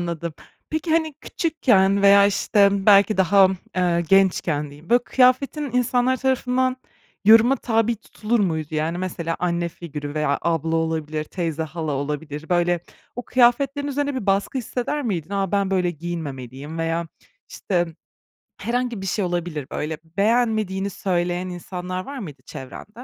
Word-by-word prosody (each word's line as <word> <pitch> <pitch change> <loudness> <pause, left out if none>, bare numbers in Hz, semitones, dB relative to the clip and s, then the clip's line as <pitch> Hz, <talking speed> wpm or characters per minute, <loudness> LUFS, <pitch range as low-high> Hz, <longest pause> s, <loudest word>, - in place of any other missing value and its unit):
Anladım. 170 -1 -4 0.4
Peki, 315 +1 -2
hani 315 -2 +1
küçükken 225 - +1
veya 200 0 +7
işte 200 -1 +2
belki 205 +1 +6
daha, 190 +1 +5 0.3
eee, 175 -2 +2
gençken 175 -6 +2
diyeyim, 150 +6 -15
böyle, 240 0 +5
kıyafetin 265 +4 +2
insanlar 250 +1 +2
tarafından 255 0 0 0.5
yoruma 225 +5 +7
tabi 225 0 0
tutulur 220 +1 -2
muydu? 160 -5 -1
Yani, 160 +3 -1
mesela 170 -3 -3
anne 170 -1 -1
figürü 150 -4 -7
veya 150 -2 0
abla 165 -1 0
olabilir, 155 -1 -2
teyze, 165 -1 -3
hala 160 -1 -4
olabilir, 150 +2 -4
böyle 175 -1 +2 0.4
o 245 - -3
kıyafetlerin 265 +3 +2
üzerine 285 0 -1
bir 235 -6 -4
baskı 195 +7 +1
hisseder 255 +5 -3
miydin? 185 - -3
A, 195 -2 -1
ben 200 -1 +1
böyle 180 -2 +1
giyinmemeliyim 150 -3 -6
veya 165 +1 -1 0.4
işte 175 -3 -1 0.7
herhangi 240 -3 -2
bir - - -5
şey 195 +1 0
olabilir. 175 -5 -3
Böyle 155 +1 -3 0.2
beğenmediğini 215 -3 +1
söyleyen 180 -1 -1
insanlar 180 +1 -5
var 280 0 -7
mıydı 150 - -8
çevrende? 130 +9 -9
185 Hz, 140 wpm, -22 LUFS, 165-235 Hz, 0.7 s, veya